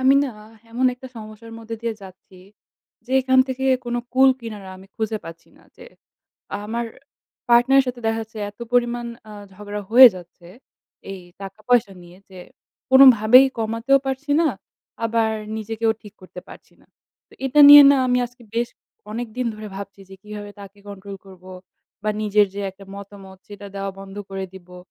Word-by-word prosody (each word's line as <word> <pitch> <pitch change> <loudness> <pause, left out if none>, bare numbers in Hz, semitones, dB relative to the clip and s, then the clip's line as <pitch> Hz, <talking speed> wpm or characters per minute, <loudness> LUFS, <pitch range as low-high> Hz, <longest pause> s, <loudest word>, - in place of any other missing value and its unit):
আমি 260 +1 +4
না - - -3 0.4
এমন 250 +3 0
একটা 260 +1 -12
সমস্যার 220 +1 -11
মধ্যে 225 0 -7
দিয়ে 230 -1 -2
যাচ্ছি, 190 0 -15 0.7
যে - - -14
এইখান 260 0 +2
থেকে 260 0 -4 0.2
কোন 240 0 -4 0.2
কুল 265 +1 +5
কিনারা 210 -5 -9
আমি 190 - -16
খুঁজে 220 -1 -3
পাচ্ছি 165 0 -12
না। - - -22
যে - - -14 0.8
আমার 230 +3 -3 0.6
পার্টনার 240 +3 +5
এর - - -2
সাথে 245 -1 -6
দেখা 225 0 0
যাচ্ছে 220 0 -12
এত 205 - -33
পরিমাণ 240 -1 0 0.2
আ - - -10 0.2
ঝগড়া 205 +1 -7
হয়ে 250 +2 +10
যাচ্ছে 175 0 -15 0.7
এই 190 - -9 0.2
টাকা 195 +2 -10
পয়সা 245 -5 +2
নিয়ে 175 +1 -16
যে 185 - -13 0.5
কোনভাবেই 255 -1 +7
কমাতেও 230 +5 +1
পারছি 270 +2 -4
না, 335 - +2 0.6
আবার 225 -1 0 0.3
নিজেকেও 220 +1 -2
ঠিক 210 - -14
করতে 185 -1 -11
পারছি - - -15
না। - - -26 0.4
তো - - -26
এটা 270 +3 +3
নিয়ে 290 0 +11
না 280 - +4
আমি 250 0 +1
আজকে 245 +1 -21
বেশ 235 +1 -1 0.4
অনেকদিন 235 +2 -5
ধরে 215 0 -9
ভাবছি 200 0 -9
যে - - -10
কিভাবে 210 -1 -9
তাকে 200 0 -13
কন্ট্রোল 200 0 -9
করবো 185 -1 -15 0.5
বা 215 - +1
নিজের 210 0 +3
যে 200 - -5
একটা 195 +1 -16
মতামত 200 -1 -12
সেইটা 205 0 -11
দেওয়া 195 0 -4
বন্ধ 195 0 -11
করে 195 0 -5
দিবো 180 -1 -14
220 Hz, 170 wpm, -21 LUFS, 200-245 Hz, 0.8 s, নিয়ে